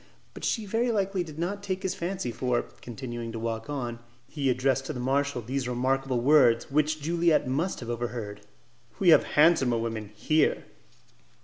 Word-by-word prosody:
But -, -, -11 dB
she 220 Hz, -, 0 dB
very 230 Hz, +4 st, 0 dB
likely 195 Hz, -3 st, 0 dB
did 155 Hz, -3 st, -11 dB
not 190 Hz, +5 st, -2 dB
take 190 Hz, -1 st, -3 dB
his 190 Hz, -, -1 dB
fancy, 180 Hz, -8 st, -3 dB
for, 125 Hz, 0 st, 0 dB, 0.2 s
continuing 120 Hz, -1 st, -6 dB
to 115 Hz, -, -4 dB
walk 115 Hz, +1 st, -4 dB
on, 120 Hz, -5 st, -4 dB, 0.3 s
he 140 Hz, -3 st, -1 dB
addressed 135 Hz, +1 st, +1 dB
to -, -, -3 dB
the 125 Hz, -, -6 dB
marshal 135 Hz, 0 st, 0 dB
these 130 Hz, +2 st, -2 dB
remarkable 130 Hz, 0 st, 0 dB
words, 125 Hz, -3 st, +4 dB
which 155 Hz, +2 st, +1 dB
Juliette 170 Hz, -2 st, +2 dB
must 150 Hz, +8 st, -1 dB
have 120 Hz, -, -7 dB
overheard, 115 Hz, -4 st, -4 dB, 0.6 s
"We 185 Hz, -, +3 dB
have 165 Hz, -, +7 dB
handsomer 150 Hz, -6 st, +5 dB
women 115 Hz, -2 st, -4 dB
here." 155 Hz, +8 st, +1 dB
135 Hz, 170 wpm, -27 LUFS, 120-165 Hz, 0.6 s, have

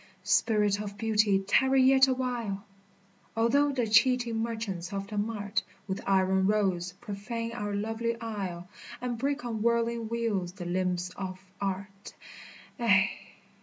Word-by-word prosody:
Spirit 210 Hz, -2 st, +2 dB
of 205 Hz, -1 st, -6 dB
Beauty 210 Hz, -3 st, +2 dB
tarry 265 Hz, +2 st, +4 dB
yet 265 Hz, +1 st, +6 dB
awhile! 240 Hz, -6 st, -2 dB, 0.7 s
Although 280 Hz, +6 st, +3 dB
the 250 Hz, -4 st, 0 dB
cheating 230 Hz, +1 st, +3 dB
merchants 220 Hz, -6 st, -3 dB
of 195 Hz, -1 st, -3 dB
the 210 Hz, +1 st, -6 dB
mart 210 Hz, 0 st, -1 dB, 0.3 s
With 190 Hz, 0 st, -3 dB
iron 190 Hz, 0 st, +3 dB
roads 190 Hz, -4 st, +1 dB
profane 215 Hz, +4 st, -5 dB
our 205 Hz, -3 st, -3 dB
lovely 225 Hz, +3 st, -2 dB
isle, 195 Hz, -6 st, -5 dB, 0.3 s
And 245 Hz, -1 st, -2 dB
break 280 Hz, +1 st, -1 dB
on 225 Hz, -3 st, -3 dB
whirling 235 Hz, 0 st, +1 dB
wheels 215 Hz, -6 st, -1 dB
the 185 Hz, -3 st, -7 dB
limbs 180 Hz, 0 st, -1 dB
of 185 Hz, -1 st, -5 dB, 0.2 s
Art, 195 Hz, 0 st, -4 dB, 0.6 s
Ay 195 Hz, -5 st, +4 dB
210 Hz, 130 wpm, -29 LUFS, 195-235 Hz, 0.7 s, yet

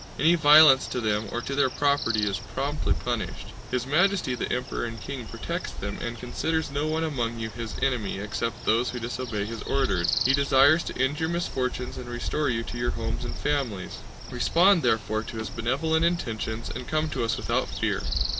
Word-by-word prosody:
Any 165 Hz, +2 st, +4 dB
violence 150 Hz, -3 st, +7 dB
to 125 Hz, -, -3 dB
them 110 Hz, -1 st, 0 dB
or 120 Hz, -, -2 dB
to 140 Hz, -, -4 dB
their 140 Hz, -1 st, +3 dB
property 125 Hz, -6 st, +1 dB
is 100 Hz, -1 st, -1 dB, 0.2 s
promptly 145 Hz, +3 st, 0 dB
punished. -, -, -3 dB, 0.2 s
His 125 Hz, -1 st, -1 dB
Majesty 165 Hz, 0 st, +2 dB
the 125 Hz, -, -3 dB
Emperor 125 Hz, +1 st, -2 dB
and 115 Hz, -1 st, -5 dB
King -, -, -6 dB
protects -, -, -5 dB
them, 100 Hz, 0 st, -5 dB
and 120 Hz, 0 st, -4 dB
considers 160 Hz, +5 st, -2 dB
no 145 Hz, +2 st, -1 dB
one 160 Hz, +1 st, 0 dB
among 120 Hz, -7 st, -2 dB
you 110 Hz, -1 st, -4 dB
his 115 Hz, 0 st, -6 dB
enemy 125 Hz, -8 st, 0 dB
except 105 Hz, +3 st, -4 dB
those 115 Hz, +2 st, +2 dB
who 125 Hz, -, -4 dB
disobey 115 Hz, -2 st, -3 dB
his 115 Hz, 0 st, -6 dB
orders. 95 Hz, -12 st, +1 dB
He 135 Hz, -, +5 dB
desires 140 Hz, +3 st, +5 dB
to -, -, -5 dB
end 130 Hz, +3 st, +1 dB
your 160 Hz, 0 st, 0 dB
misfortunes 130 Hz, -7 st, -2 dB
and 120 Hz, -, -8 dB
restore 125 Hz, +4 st, -1 dB
you 115 Hz, -2 st, -1 dB
to 120 Hz, -, -6 dB
your 120 Hz, 0 st, 0 dB
homes 115 Hz, +2 st, -3 dB
and 120 Hz, -, -5 dB
families. 130 Hz, -10 st, -2 dB, 0.3 s
Respond, 180 Hz, +1 st, +4 dB
therefore, 110 Hz, -3 st, +1 dB
to 115 Hz, -, -8 dB
his 110 Hz, +2 st, -4 dB
benevolent 135 Hz, +7 st, 0 dB
intentions 115 Hz, -10 st, -2 dB
and 125 Hz, +1 st, -7 dB
come 155 Hz, 0 st, 0 dB
to -, -, -2 dB
us 115 Hz, -, 0 dB
without -, -, 0 dB
fear. -, -, -1 dB
125 Hz, 190 wpm, -26 LUFS, 115-145 Hz, 0.3 s, violence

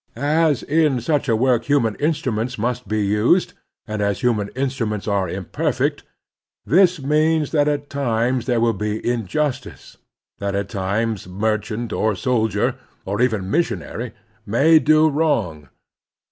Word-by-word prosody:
As 150 Hz, +2 st, +1 dB
in 150 Hz, -4 st, +2 dB
such 145 Hz, +4 st, -1 dB
a 115 Hz, -, +3 dB
work 120 Hz, 0 st, +2 dB
human 135 Hz, -7 st, +2 dB
instruments 130 Hz, -6 st, -1 dB
must 125 Hz, +3 st, -2 dB
be 105 Hz, -1 st, 0 dB
used, 105 Hz, -, +2 dB, 0.3 s
and 110 Hz, -2 st, -4 dB
as 100 Hz, 0 st, -1 dB
htunan 105 Hz, -5 st, +1 dB
instruments 120 Hz, -7 st, -2 dB
are 100 Hz, -3 st, 0 dB
imperfect, 95 Hz, 0 st, -2 dB, 0.6 s
this 180 Hz, -, +4 dB
means 155 Hz, +2 st, +1 dB
that 145 Hz, -2 st, +2 dB
at 145 Hz, -1 st, -1 dB
times 125 Hz, -2 st, -1 dB
there 120 Hz, -2 st, +2 dB
will 115 Hz, 0 st, +2 dB
be 105 Hz, +2 st, -3 dB
injustice; 120 Hz, +5 st, -3 dB, 0.4 s
that 100 Hz, -1 st, -2 dB
at 100 Hz, -1 st, -2 dB
times 100 Hz, +2 st, -2 dB
merchant 110 Hz, +4 st, -2 dB
or 110 Hz, -1 st, 0 dB
soldier, 110 Hz, -2 st, 0 dB, 0.3 s
or 100 Hz, +4 st, -2 dB
even 110 Hz, -6 st, 0 dB
missionary, 125 Hz, -7 st, -2 dB, 0.3 s
may 140 Hz, +10 st, +4 dB
do 155 Hz, +1 st, +4 dB
wrong. 110 Hz, -, -1 dB
120 Hz, 135 wpm, -21 LUFS, 105-145 Hz, 0.6 s, this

